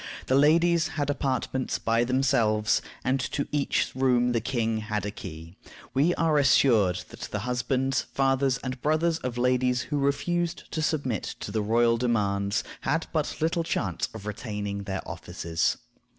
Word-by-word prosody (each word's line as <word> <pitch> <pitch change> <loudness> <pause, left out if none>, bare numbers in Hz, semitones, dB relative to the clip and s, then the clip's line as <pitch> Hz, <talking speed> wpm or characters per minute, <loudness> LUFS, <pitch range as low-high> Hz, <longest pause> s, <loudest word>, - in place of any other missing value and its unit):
The - - 0
ladies 165 +3 +4
had 145 -1 +1
apartments 130 -2 -1
by 115 +1 +1
themselves, 115 -5 +2 0.2
and 130 +1 +1
to 140 +2 -2
each 145 -2 0
room 125 -2 +2
the 115 -1 +1
king 115 -2 -1
had 105 -1 -3
a 105 - -2
key. 85 -5 -9 0.4
We 150 +7 +3
are 160 -3 +2
assured 110 -9 +4
that - - -12
the - - -3
husbands, 125 +3 0
fathers, 135 -1 +1
and 130 -1 -4
brothers 160 +2 +1
of 125 -5 -4
ladies 125 0 +2
who 145 - +1
refused 170 +5 -1
to 160 - -2
submit 140 - -1
to - - -5
the 110 +1 0
royal 115 +2 +3
demands 100 -5 0 0.2
had - - 0
but - - -2
little 165 +1 +1
chance 95 - -2
of 105 -2 -8
retaining 105 -2 -4
their 95 -1 -4
offices. 80 0 -2
125 Hz, 155 wpm, -27 LUFS, 110-140 Hz, 0.4 s, ladies